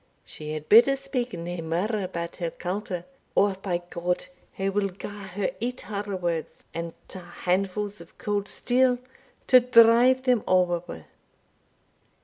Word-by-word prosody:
"She 155 0 -7
had 155 0 -6
better 240 +5 +7
speak 270 -3 -3
nae 170 0 -5
mair 190 +7 -1
about 170 -2 -5
her 170 -2 -2
culter, 180 0 -4 0.3
or, 200 0 +4
by 175 -3 -2
G! 175 +1 -1 0.3
her 195 0 -1
will 200 0 0
gar 200 +1 -8
her 195 +1 -2
eat 250 +2 -3
her 205 -1 -4
words, 170 -3 -3
and 170 0 -4
twa 185 - -8
handfuls 195 +4 -2
o' - - -12
cauld 205 -1 -2
steel 250 +2 +2 0.5
to 255 - +8
drive 245 +1 +6
them 250 -4 +2
ower 180 -2 +3
wi'!" - - -8
195 Hz, 145 wpm, -26 LUFS, 175-230 Hz, 0.5 s, to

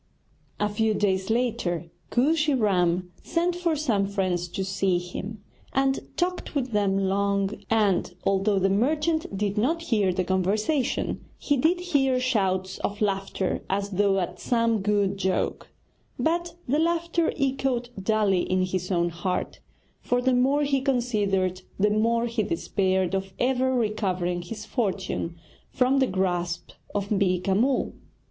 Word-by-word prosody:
A 210 - +2
few 215 +1 +1
days 190 -1 0
later 220 -8 -1 0.2
Kooshy 300 +3 +2
Ram 180 -5 +1
sent 345 +1 0
for 345 -2 0
some 225 -10 +1
friends 185 -3 -1
to 190 +2 -3
see 190 -1 +1
him, 195 +4 -6 0.3
and 270 0 +2 0.2
talked 360 -2 -2
with 260 -3 -1
them 200 -2 +2
long, 195 0 +1 0.2
and, 210 -5 +2
although 195 +1 +2
the 190 0 +3
merchant 300 +3 +1
did 205 +1 0
not 325 +9 +1
hear 210 - +2
the 185 +1 0
conversation, 210 - 0
he 290 - +1
did 320 +7 +2
hear 275 -8 +2
shouts 190 -7 0
of 205 +1 -3
laughter 195 -2 -1
as 200 +1 -1
though 195 0 +2
at 180 0 -4
some 230 -3 +1
good 200 -1 +1
joke; 190 -1 -1 0.5
but 340 +2 0
the 285 +5 +2
laughter 335 0 +1
echoed 265 -3 0
dully 205 -2 +2
in 185 +1 +1
his 185 0 -3
own 175 -1 +2
heart, 175 +2 -3 0.4
for 245 - 0
the 260 +1 +2
more 270 +4 +3
he 275 -2 +1
considered 205 -8 0 0.2
the 205 +1 +3
more 230 +2 +2
he 230 -1 -1
despaired 190 0 0
of 195 0 -2
ever 260 +1 +1
recovering 190 -6 0
his 210 +4 -7
fortune 200 -6 -2 0.3
from 260 +2 +2
the 265 - +3
grasp 175 -3 -1 0.2
of 200 0 -1
Beeka 190 -2 +1
Mull. 255 +6 +1
210 Hz, 145 wpm, -26 LUFS, 190-255 Hz, 0.5 s, the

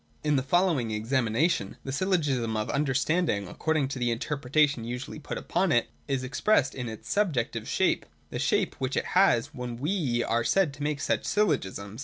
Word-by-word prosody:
In 150 -1 +2
the 135 - +2
following 150 -4 +2
examination, 115 - 0
the 135 - -4
Syllogism 140 - 0
of 110 - -2
Under 140 -2 0
standing, 140 - +1
according 155 - 0
to 135 - -4
the 120 -1 +1
interpretation 140 +2 +1
usually 125 +5 -5
put 150 - -5
upon 190 -2 0
it, 120 -4 +2 0.2
is 135 -2 -1
expressed 145 +2 +2
in 125 -3 -4
its 110 0 -9
subjective 160 - 0
shape; - - +1 0.2
the - - -3
shape - - +1
which 130 0 -1
it - - 0
has 180 -12 +4
when 125 -2 -5
we 140 -5 0
are 115 0 +1
said 145 +6 +2
to 145 - -11
make 145 -1 -1
such - - 0
Syllogisms. 110 - -1
135 Hz, 180 wpm, -28 LUFS, 120-155 Hz, 0.2 s, has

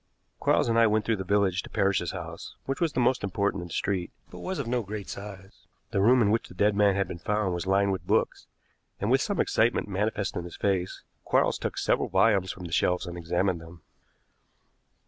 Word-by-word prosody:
Quarles - - +2
and 115 0 +3
I 115 - +6
went 110 0 +1
through 115 -2 +1
the 95 - -4
village 95 -1 +1
to - - -12
Parrish's 100 -3 +1
house, - - -7
which 135 +3 -3
was 165 -4 +1
the - - 0
most 125 -1 +2
important 100 0 -1
in 85 - -7
the 85 - -9
street, 95 -3 -1 0.2
but - - -9
was 190 0 -4
of 140 - -2
no 120 +1 0
great 105 -1 -6
size. 100 -1 -10 0.2
The 100 - +1
room 120 +4 +5
in 100 - +2
which 115 - 0
the - - -14
dead 105 +2 +2
man 100 -1 +4
had 100 0 0
been 85 - -7
found 105 0 0
was 85 +1 -4
lined 100 +1 +3
with 95 - -4
books, - - 0 0.5
and, 105 +4 0
with 135 +1 +4
some 205 - -1
excitement 115 0 +2
manifest 105 +1 -1
in 90 - -3
his 85 - -9
face, 95 -2 -1 0.2
Quarles - - +2
took - - -4
several - - +1
volumes 100 -5 +3
from 95 - -10
the 85 - -7
shelves 90 +2 +1
and 85 -1 -6
examined 85 +1 -1
them. 80 0 -13
100 Hz, 225 wpm, -27 LUFS, 95-110 Hz, 0.5 s, I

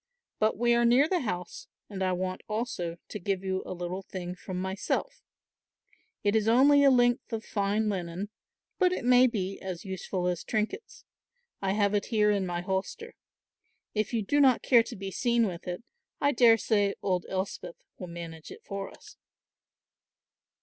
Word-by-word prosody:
But 215 -1 +2
we 240 +1 +3
are 235 0 +3
near 245 +5 +5
the 360 +1 +1
house 180 - -5 0.2
and 195 -2 -7
I 185 -1 +1
want 185 0 -2
also 210 -7 -3
to 210 - -6
give 195 +1 -2
you 190 0 -1
a - - -4
little 180 +2 -4
thing 180 -2 -6
from 180 0 -6
myself; 190 - -2 1.0
it 205 +1 +2
is 220 -1 +2
only 280 +5 +6
a 280 - +7
length 245 0 +3
of 225 -1 -4
fine 205 +1 0
linen, 185 0 -3 0.5
but 365 -2 +4
it 365 - -3
may 250 +1 +6
be 195 -5 -3
as 185 -2 -6
useful 190 -1 -3
as 180 -1 -1
trinkets. 225 - -3 0.6
I 195 -1 0
have 205 -1 +2
it 205 -1 +1
here 210 -2 +3
in 200 -2 0
my 175 0 -2
holster. 190 +1 -3 0.8
If 215 -1 -1
you 230 -3 0
do 290 +9 +1
not 265 -4 +5
care 240 -3 +6
to 230 - -7
be 195 0 -6
seen 235 +1 +2
with 180 -3 -5
it, 180 +5 -4 0.4
I 285 - +3
daresay 225 -5 +4
old 185 -3 0
Elspeth 190 -2 -4 0.2
will 180 - -6
manage 165 -2 -8
it - - -11
for 200 0 -5
us." - - -16
200 Hz, 175 wpm, -29 LUFS, 185-235 Hz, 1.0 s, a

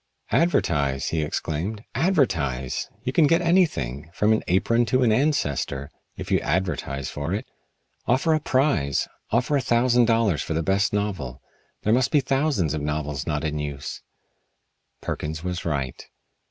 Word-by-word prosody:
"Advertise!" 70 - +1
he 80 - 0
exclaimed. 85 +7 -3
"Advertise! 85 - 0
You 130 +1 -2
can 155 -1 +5
get 165 +3 +4
anything, 150 - +1
from 105 +1 +3
an 110 - 0
apron 115 +6 +3
to 130 +2 +2
an 115 - +4
ancestor, 75 - 0 0.3
if - - -6
you - - +4
advertise 75 -6 -2
for 75 +6 -2
it. 105 - -4 0.6
Offer 135 +6 +3
a 155 - +2
prize 130 - +1 0.2
offer 125 +6 +1
a 140 - +2
thousand 120 0 +3
dollars 115 -8 +2
for 80 - -3
the 80 - 0
best 100 +5 +2
novel. 95 -12 -2 0.4
There 105 - +3
must 125 0 +3
be 150 - +4
thousands 135 - +1
of 75 - -2
novels 75 -1 -3
not 75 -1 -1
in 75 -1 -2
use." 70 -2 -5 1.0
Perkins 80 +2 -4
was 90 -1 -3
right. 70 -6 -2
95 Hz, 155 wpm, -24 LUFS, -, 1.0 s, can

